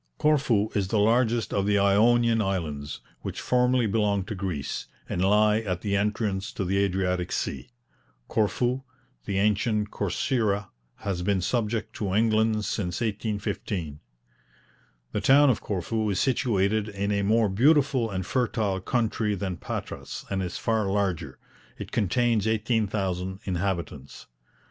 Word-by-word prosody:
Corfu 130 -9 +2
is 100 -2 0
the 110 - 0
largest 115 +2 +2
of 100 0 +1
the 105 0 +3
Ionian 115 +3 +4
Islands, 80 -8 -3 0.2
which - - -5
formerly 125 -1 +2
belonged 100 -2 +1
to - - -2
Greece, 95 -7 -4 0.2
and 90 - -1
lie 105 +2 +4
at 90 -5 -3
the 100 -2 -1
entrance 105 -1 -1
to 95 - -3
the 95 +2 0
Adriatic 90 -2 0
sea. - - -3 0.6
Corfu, 120 +5 0 0.4
the 100 - -2
ancient 105 +1 +1
Corcyra, 105 - -1 0.3
has 95 -3 -2
been 95 +1 +1
subject 110 +3 -1
to 100 -3 -1
England 110 -1 +2
since 90 -3 -2
1815. 100 -7 -3 1.1
The - - -2
town 140 +1 +6
of 115 - -2
Corfu 105 +3 -2
is 95 - 0
situated 110 -5 +1
in 100 0 -2
a 100 -1 +1
more 110 +2 +3
beautiful 130 +3 +3
and 95 -2 -3
fertile 110 -5 0
country 110 -1 0
than 95 -2 -3
Patras, - - -6
and 95 -1 0
is 90 -1 -4
far 110 -3 0
larger. 90 -9 -1 0.4
It - - -7
contains 115 +1 +1
18,000 100 -4 -1
inhabitants. 85 -7 -3
105 Hz, 135 wpm, -26 LUFS, 95-115 Hz, 1.1 s, town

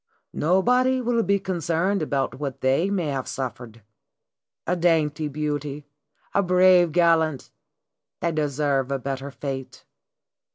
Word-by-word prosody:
Nobody 250 - +2
will 240 -1 +1
be 200 -2 +2
concerned 180 +1 -1
about 135 -3 -2
what 140 -3 -5
they 135 +8 +2
may 180 -6 -1
have 135 -2 -3
suffered. 120 -4 -6 0.8
A 180 - 0
dainty 160 -3 +1
beauty, 145 -1 -4 0.5
a 200 - +3
brave 180 -2 +5
gallant 160 -4 +2 0.7
they 170 - 0
deserve 140 -3 0
a 140 - +1
better 135 +1 -5
fate. 135 -1 -7
155 Hz, 120 wpm, -24 LUFS, 140-180 Hz, 0.8 s, brave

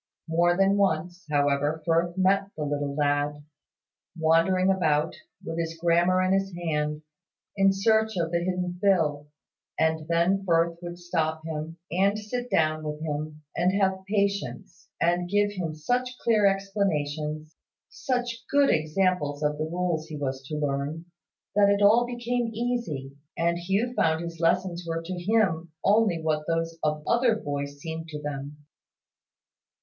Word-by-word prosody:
More 175 +2 +2
than 195 +1 +3
once, 180 -2 0
however, 145 +1 +1
Firth 170 +2 +1
met 195 +1 +2
the 155 - -2
little 145 -1 -2
lad, 145 0 0 0.7
wandering 165 +4 +3
about, 155 -5 +1 0.3
with 165 +1 -4
his 165 0 -3
grammar 175 +2 +3
in 185 +1 +2
his 195 0 +1
hand, 150 -3 -2 0.5
in 195 -1 +4
search 220 +1 +2
of 165 -1 -1
the 170 - +1
hidden 180 0 -2
Phil; 155 -7 +2 0.5
and 160 -1 +1
then 170 +4 +2
Firth 170 -2 +2
would 175 0 -6
stop 160 -2 -2
him, 160 +1 -5
and 195 +4 +2
sit 245 +4 -4
down 155 -4 +1
with 150 0 -4
him, 155 0 -4
and 185 +3 +2
have 190 -1 +1
patience, 200 -1 -2
and 175 +1 +1
give 205 +1 +2
him 175 -6 -4
such 245 +10 -1
clear 215 -3 +4
explanations, 155 -6 -1 0.3
such 245 -2 -2
good 285 0 +4
examples 155 -2 0
of 150 0 0
the 155 - 0
rules 175 -3 -1
he 155 - -6
was 135 -2 -3
to 150 - -4
learn, 145 +3 -2 0.5
that 205 -1 +5
it 200 0 +3
all 230 +4 +5
became 240 0 -2
easy, 220 - -3 0.2
and 170 +1 +1
Hugh 195 +8 0
found 160 -7 +1
his 170 -1 -7
lessons 175 +1 +1
were 165 0 -3
to 180 +3 -5
him 175 -3 +1
only 205 -4 +3
what 155 -1 -1
those 165 0 -1
of 150 0 0
other 235 -1 +3
boys 145 -7 -4
seemed 160 +1 -6
to 150 -2 -6
them. 145 0 -6
170 Hz, 150 wpm, -26 LUFS, 155-195 Hz, 0.7 s, that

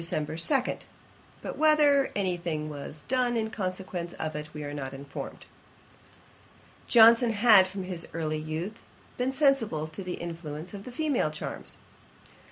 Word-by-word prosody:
2.' 165 -3 -1 1.2
But - - -5
whether 300 -3 +5
any 190 -3 0
thing 160 -3 -3
was 145 +1 -8
done 250 -2 +1
in 220 -1 -1
consequence 185 -3 -4
of 155 -1 -4
it 150 +1 -6
we 150 -1 -6
are 145 0 -5
not 135 -2 -5
informed. 140 +1 -8 1.4
Johnson 230 0 +7
had, 205 -3 +7
from 190 0 -5
his 180 -2 -5
early 155 -1 -2
youth, 160 +8 -5 0.4
been 250 +1 +1
sensible 265 - +2
to 155 +5 -7
the 180 -1 -4
influence 165 0 -6
of 200 +2 -8
female 280 - 0
charms. 155 0 -4
180 Hz, 140 wpm, -28 LUFS, 155-230 Hz, 1.4 s, Johnson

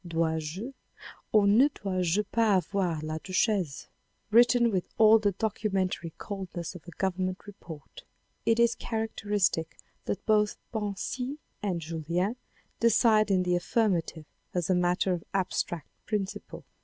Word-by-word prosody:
" - - -43
Dois 165 -1 0
je 190 - -6 0.6
ou 210 -2 +5
ne 220 +8 +6
dois 195 -8 -3
je 180 +5 +2
pas 220 0 +2
avoir 180 -4 0
la 155 0 -3
duchesse? 185 -4 0 0.2
" - - -45
written 235 +1 +5
with 185 -3 -1
all 220 0 +7
the 205 -2 +1
documentary 195 -4 -1
coldness 185 -4 -6
of 180 -1 -12
a - - -8
Government 185 0 -2
report. 165 -7 -11 0.4
It 230 0 +2
is 235 0 +5
characteristic 210 -7 -1 0.3
that 200 - -3
both 210 -1 +2 0.2
Bansi 225 +6 -3 0.2
and 190 -5 -1
Julien 170 +6 -2 0.4
decide 225 -2 +4
in 185 -2 +3
the 180 0 +1
affirmative 175 -4 0 0.3
as 180 +1 0
a - - +5
matter 180 +1 +2
of 175 - -4
abstract 175 -3 -1 0.2
principle. 205 -3 -4
195 Hz, 145 wpm, -28 LUFS, 175-215 Hz, 0.6 s, all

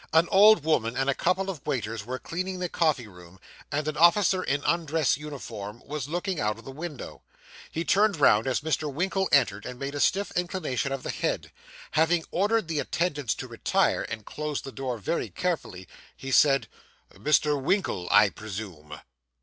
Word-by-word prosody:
An 165 +2 +5
old 205 -2 +7
woman 125 -7 +1
and 135 +1 +2
a - - 0
couple 185 +6 0
of 175 -9 -5
waiters 110 -3 -3
were 125 +4 -4
cleaning 185 +6 -4
the 180 -1 -3
coffee 155 -9 +1
room, 90 -2 -15 0.3
and 150 +1 -1
an 155 - -2
officer 185 +2 +5
in 145 -4 -1
undress 165 -3 +1
uniform 120 -7 -8
was 145 -2 -4
looking 175 +3 -2
out 105 0 0
of 115 - -14
the 135 - -7
window. 150 -1 -7 0.5
He 165 +1 -3
turned 205 -2 +3
round 110 -4 +5
as 130 - 0
Mr. 155 -1 -1
Winkle 190 +6 -1
entered, 105 -8 +3
and 125 -1 -7
made 140 +2 -4
a 145 - -4
stiff 200 +7 +1
inclination 175 -7 -2
of 135 -1 -3
the - - -3
head. - - -2 0.4
Having 160 +1 +2
ordered 205 +1 +1
the 160 -2 -1
attendants 145 -10 -1
to - - -7
retire, - - +1
and 110 -2 -6
closed 150 -1 -4
the 135 - -7
door 130 -2 -4
very 110 - -2
carefully, 160 - -3 0.3
he 135 - -6
said, 135 0 +4 0.5
'Mr. 150 -1 +2
Winkle, 140 - 0
I 105 0 +6
presume? 95 -9 -8
145 Hz, 180 wpm, -27 LUFS, 120-175 Hz, 0.5 s, old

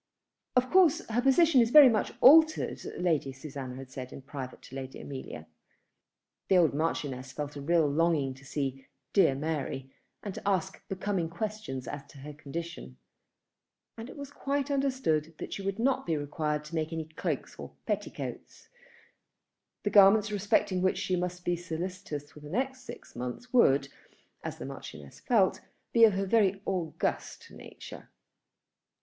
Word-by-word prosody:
"Of 255 0 +2
course 365 -5 +5
her 230 +2 +1
position 270 +1 +5
is 230 - +2
very 295 +1 +10
much 225 -4 +1
altered," 315 +3 +6 0.2
Lady 160 -6 0
Susanna 135 -1 -7
had 130 0 -10
said 130 -1 -7
in 135 - -10
private 135 -2 -8
to 130 - -11
Lady 135 -1 -7
Amelia. 130 - -7 1.0
The 190 - +4
old 165 -5 +4
Marchioness 140 -4 -2
felt 145 0 -5
a 140 - -6
real 165 +1 +3
longing 150 -2 +1
to 135 +1 -17
see 135 -1 -4 0.3
"dear 195 -9 +5
Mary," 140 -3 -3 0.3
and 200 - -4
to - - -7
ask 190 -1 0
becoming 190 -3 -2
questions 170 - -5
as 145 -1 -5
to 145 - -16
her 145 +2 -9
condition. 150 - -7 1.0
And 230 +2 -8
it - - -11
was 280 -1 -8
quite 280 0 -2
understood 255 - 0
that - - -6
she - - -5
was 195 0 -2
not 255 +3 +2
to 165 - +1
be - - +1
required 150 +1 -2
to 160 - -11
make 160 0 -1
any 160 -1 -3
cloaks 160 0 -4
or - - -9
petticoats. - - -5 1.1
The 205 - 0
garments 205 +1 +6
respecting 205 -2 +1
which 185 0 +2
she 185 - 0
must 180 0 -3
be 175 - +1
solicitous 170 -3 -5
for - - -13
the 150 0 -11
next 260 - -2
six - - -11
months 125 - -6
would, 140 - +5 0.6
as - - -5
the - - -7
Marchioness 70 -2 -9
felt, 210 -6 +2 0.3
be 230 -1 +8
of 205 -4 +3
a 195 - 0
very 195 -2 +3
august 180 -4 -3
nature. - - -11
170 Hz, 165 wpm, -29 LUFS, 140-215 Hz, 1.1 s, very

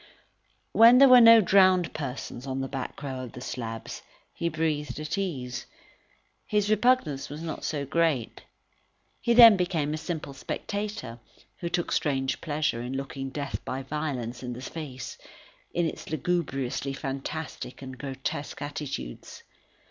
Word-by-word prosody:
When 230 +2 +8
there 275 +1 +9
were 250 -1 +9
no 230 -1 +9
drowned 185 -2 +4
persons 135 -2 -5
on 135 0 -2
the 135 - -2
back 135 +2 -6
row 135 -2 -4
of 125 - -9
slabs, 115 -3 -5 0.3
he 170 - -1
breathed 150 -4 -2
at 155 +4 -3
ease; 140 -11 -4 0.8
his 210 0 +1
repugnance 215 - +2
was 150 +3 -7
not 160 -2 -5
so 145 -3 -2
great. 155 -5 0 0.8
He 235 - +2
then 230 -3 +10
became 165 -5 0
a - - -2
simple 160 -3 -5
spectator, 200 - -5 0.4
who 170 - -3
took 175 0 -1
strange 135 -3 0
pleasure 150 -5 -1
in 125 +2 -4
looking 135 0 -5
death 140 0 -5
by 135 +1 -4
violence 130 -5 -4
in 125 -1 -5
the 125 - -8
face, 130 -4 -7 0.5
in 175 - 0
its - - -7
lugubriously 140 -4 -1
fantastic 135 0 -5
and 130 -1 -7
grotesque 135 +2 -5
attitudes. 145 - -6
145 Hz, 140 wpm, -27 LUFS, 135-175 Hz, 0.8 s, then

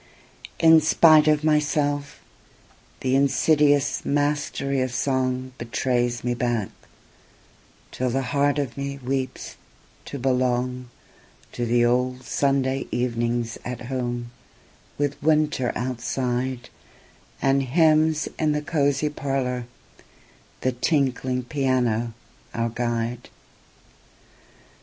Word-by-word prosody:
In 160 -1 +6
spite 155 0 +5
of 150 -1 +3
myself, 150 -2 0 0.8
the 130 0 0
insidious 145 +1 +3
mastery 145 -2 0
of 130 - 0
songBetrays 125 -1 -1
me 120 0 0
back, 120 -4 -1 1.2
till 130 0 -2
the 135 +2 -1
heart 140 +3 +1
of 140 -5 -2
me 140 0 -4
weeps 130 -1 -4 0.5
to 140 - -6
belongTo 125 -1 0 0.7
the 120 0 +2
old 125 +1 0
Sunday 135 -1 0
evenings 120 -1 -1
at 125 -1 -5
home, 120 -2 -3 0.7
with 145 -1 -2
winter 150 -4 +2
outsideAnd 125 0 -2 1.0
hymns 155 +1 +3
in 155 -1 +2
the 150 0 -2
cosy 145 -1 +1
parlour, 135 -4 -2 0.9
the 130 - +1
tinkling 130 -1 0
piano 125 -4 0 0.4
our 115 0 0
guide. 120 0 -3
130 Hz, 90 wpm, -24 LUFS, 120-145 Hz, 1.2 s, In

